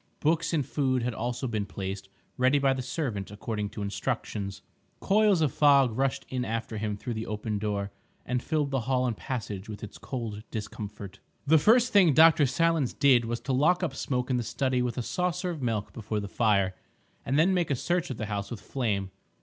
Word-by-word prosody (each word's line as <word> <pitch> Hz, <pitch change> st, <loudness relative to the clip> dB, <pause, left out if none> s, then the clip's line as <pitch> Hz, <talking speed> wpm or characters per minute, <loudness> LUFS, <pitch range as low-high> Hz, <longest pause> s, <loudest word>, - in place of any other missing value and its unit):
Books 165 Hz, +2 st, +1 dB
and 150 Hz, -5 st, +1 dB
food 130 Hz, -3 st, 0 dB
had 125 Hz, 0 st, -1 dB
also 120 Hz, +3 st, -3 dB
been 105 Hz, -4 st, -2 dB
placed 95 Hz, 0 st, -5 dB, 0.3 s
ready 130 Hz, +3 st, +3 dB
by 135 Hz, -1 st, +3 dB
the 130 Hz, -, -3 dB
servant 125 Hz, -, -3 dB
according 105 Hz, 0 st, -4 dB
to 105 Hz, 0 st, -6 dB
instructions. 100 Hz, 0 st, -3 dB, 0.4 s
Coils 205 Hz, -3 st, +3 dB
of 150 Hz, -, +1 dB
fog 140 Hz, -5 st, +5 dB
rushed 135 Hz, +1 st, 0 dB
in 130 Hz, -1 st, -2 dB
after 115 Hz, -1 st, -3 dB
him 105 Hz, -1 st, -2 dB
through 120 Hz, +3 st, -4 dB
the 110 Hz, 0 st, -4 dB
open 105 Hz, 0 st, -3 dB
door 100 Hz, -1 st, -2 dB, 0.3 s
and 125 Hz, -1 st, -1 dB
filled 150 Hz, -2 st, -1 dB
the 135 Hz, -, +1 dB
hall 130 Hz, -1 st, +2 dB
and 120 Hz, -3 st, -1 dB
passage 105 Hz, -5 st, -5 dB
with 105 Hz, 0 st, -7 dB
its 105 Hz, -, -8 dB
cold 115 Hz, -5 st, -5 dB
discomfort. 105 Hz, -2 st, -7 dB, 0.3 s
The 160 Hz, +2 st, +5 dB
first 235 Hz, +9 st, +4 dB
thing 185 Hz, -7 st, +6 dB
Dr. 160 Hz, -2 st, +7 dB
Silence 165 Hz, -1 st, +1 dB
did 130 Hz, -4 st, +4 dB
was 115 Hz, +1 st, -2 dB
to 135 Hz, -, -2 dB
lock 155 Hz, +8 st, +3 dB
up 145 Hz, -6 st, -2 dB
Smoke 125 Hz, -1 st, -2 dB
in 125 Hz, -, +2 dB
the -, -, 0 dB
study 130 Hz, +1 st, 0 dB
with 120 Hz, -2 st, -2 dB
a 125 Hz, -, -1 dB
saucer 180 Hz, +4 st, -1 dB
of 160 Hz, -4 st, -6 dB
milk 110 Hz, -4 st, -2 dB
before 110 Hz, -2 st, -3 dB
the 100 Hz, -, -4 dB
fire, 100 Hz, -3 st, +2 dB, 0.5 s
and 135 Hz, +3 st, 0 dB
then 175 Hz, +5 st, +4 dB
make 175 Hz, -3 st, +1 dB
a 140 Hz, -, +2 dB
search 175 Hz, +6 st, -1 dB
of 130 Hz, -, -4 dB
the 110 Hz, -, -3 dB
house 100 Hz, -1 st, -3 dB
with 120 Hz, -, -6 dB
Flame. 100 Hz, -8 st, -2 dB
125 Hz, 205 wpm, -28 LUFS, 105-145 Hz, 0.5 s, Dr